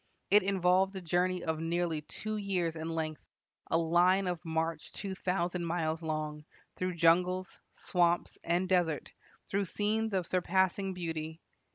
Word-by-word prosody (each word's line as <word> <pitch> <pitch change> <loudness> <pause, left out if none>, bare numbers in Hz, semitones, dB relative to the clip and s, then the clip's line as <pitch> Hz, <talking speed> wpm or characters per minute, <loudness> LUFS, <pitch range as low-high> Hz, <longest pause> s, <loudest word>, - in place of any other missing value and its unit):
It 205 +1 +7
involved 190 0 +2
a 190 - -4
journey 180 +1 +1
of 160 -1 -1
nearly 165 -1 -1
two 215 +8 -5
years 185 -5 -1
in 160 0 -4
length, 160 -2 -3 0.5
a - - +3
line 175 +4 +4
of 175 -3 -2
march 160 -1 -2
two 195 -2 -4
thousand 180 -1 -1
miles 160 -1 -1
long, 155 -1 -3 0.3
through 185 -1 -2
jungles, 180 +3 +2 0.2
swamps, 175 -2 +1
and 175 +2 +1
desert, 175 -6 +1 0.3
through 200 0 0
scenes 215 +4 0
of 185 -2 +1
surpassing 190 +2 +1
beauty." 160 -2 -4
175 Hz, 145 wpm, -32 LUFS, 165-185 Hz, 0.5 s, It